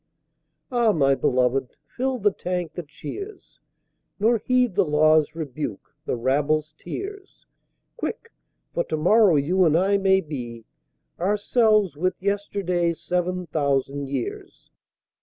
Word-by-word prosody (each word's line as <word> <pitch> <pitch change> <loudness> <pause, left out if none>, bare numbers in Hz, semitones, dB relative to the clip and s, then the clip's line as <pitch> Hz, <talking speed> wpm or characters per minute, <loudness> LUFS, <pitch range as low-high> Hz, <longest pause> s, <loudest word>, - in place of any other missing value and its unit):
Ah, 240 -3 +3
my 140 -6 +3
Beloved, 130 0 +1 0.2
fill 260 +1 -1
the 205 -2 +2
Tank 180 -3 -4
that 175 -4 -7
cheers, 400 - -9 0.6
Nor 225 +2 +3
heed 250 0 +2
the 200 +2 +3
Law's 155 0 +3
rebuke, 150 -8 -5
the - - 0
Rabble's 150 +5 0
tears, 395 - -8 0.5
Quick! 465 -1 -5 0.4
For 170 - 0
To 155 - -2
morrow 195 +3 +5
you 170 +7 +2
and 160 -2 +4
I 200 +3 +2
may 190 0 +4
be 120 -8 -7 0.5
Ourselves 210 - +2
with 185 +3 0
Yesterday's 190 -4 -1
Sev'n 180 0 -2
Thousand 140 -3 -1
Years. 135 -3 -6
175 Hz, 120 wpm, -24 LUFS, 150-205 Hz, 0.6 s, morrow